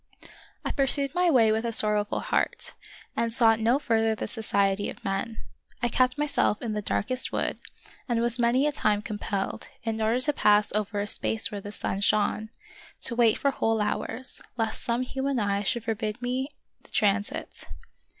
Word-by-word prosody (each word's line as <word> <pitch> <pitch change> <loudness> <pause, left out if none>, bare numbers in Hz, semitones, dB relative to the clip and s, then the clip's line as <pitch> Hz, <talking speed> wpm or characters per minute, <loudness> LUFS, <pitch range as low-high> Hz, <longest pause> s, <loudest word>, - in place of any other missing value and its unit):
I - - -1
pursued 275 0 +2
my 355 0 +3
way 230 -7 +5
with 220 +1 0
a 235 - -1
sorrowful 210 -1 +4
heart, - - -1 0.4
and 230 0 0
sought 225 -2 +5
no 230 +4 +3
further 225 -5 +1
the - - -4
society 200 -3 0
of - - -11
men. 195 +4 -2 0.5
I 240 - +2
kept 255 +3 +2
myself 290 -7 +1
in 230 -3 -3
the 210 - -2
darkest 255 +5 0
wood, - - -2 0.5
and 235 -1 +1
was 235 +1 0
many 240 +4 +3
a 300 - +2
time 210 -6 0
compelled, 205 -2 -4
in 225 -1 -2
order 225 +3 +2
to 295 +3 +1
pass 210 -4 +3
over 210 -1 -1
a - - -1
space 220 +2 0
where 205 -1 -5
the 205 - -8
sun 195 -1 -3
shone, 215 +1 +1 0.5
to 235 - +3
wait 230 -2 +4
for 280 - +1
whole 225 -4 0
hours, 235 +4 -2 0.2
lest 225 -2 -2
some 240 0 0
human 270 +1 -2
eye 200 -2 0
should 220 +3 -1
forbid 220 -1 -3
me 260 +4 -3 0.3
the - - -19
tran 205 -1 +2
sit. - - -7
225 Hz, 180 wpm, -27 LUFS, 210-250 Hz, 0.5 s, way